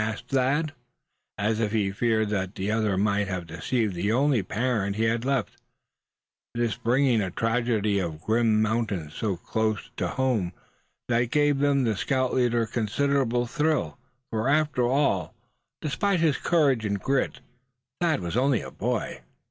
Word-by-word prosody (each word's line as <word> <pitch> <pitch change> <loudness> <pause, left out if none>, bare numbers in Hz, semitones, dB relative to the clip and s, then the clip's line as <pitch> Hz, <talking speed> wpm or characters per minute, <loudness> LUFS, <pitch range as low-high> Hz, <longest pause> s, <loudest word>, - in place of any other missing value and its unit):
asked 110 -1 -5
Thad, 135 +4 +1 0.7
suspiciously, 105 +2 +1
as 110 - -1
if 110 -3 0
he 100 -3 +1
feared 110 +1 +1
that 95 -1 -2
the 95 +2 -2
other 110 -3 +1
might 100 0 +1
have 95 -3 -3
deceived 100 +7 -1
the 95 +4 -1
only 135 0 +3
parent 105 0 -1
he 110 - 0
had 115 +1 +1
left; 135 -1 -1 1.0
this 120 -2 0
bringing 125 0 +2
a 95 - -1
tragedy 115 -1 0
of 85 -4 -2
the 75 - -15
grim 110 -1 +3
mountains 105 -8 -1
so 100 -5 -2
close 110 +4 -1 0.2
home 125 -9 0
to 90 - -21 0.5
them 120 -1 +2
had 120 -1 0
given 145 -1 +2
the 110 -3 +1
scout 130 +5 0
leader 120 -2 +2
considerable 120 +3 0
of 120 - -7
a - - -16
thrill, 155 -2 0 0.3
for 110 +3 0
after 150 -4 +2
all, 120 - +1 0.5
despite 175 +6 0
his 160 -3 +2
courage 140 -9 +2
and 100 -2 -1
grit, 135 +6 0 0.6
Thad 165 - +2
was 85 +2 -4
only 130 -1 +2
a - - -8
boy. - - -3
115 Hz, 165 wpm, -26 LUFS, 105-135 Hz, 1.0 s, only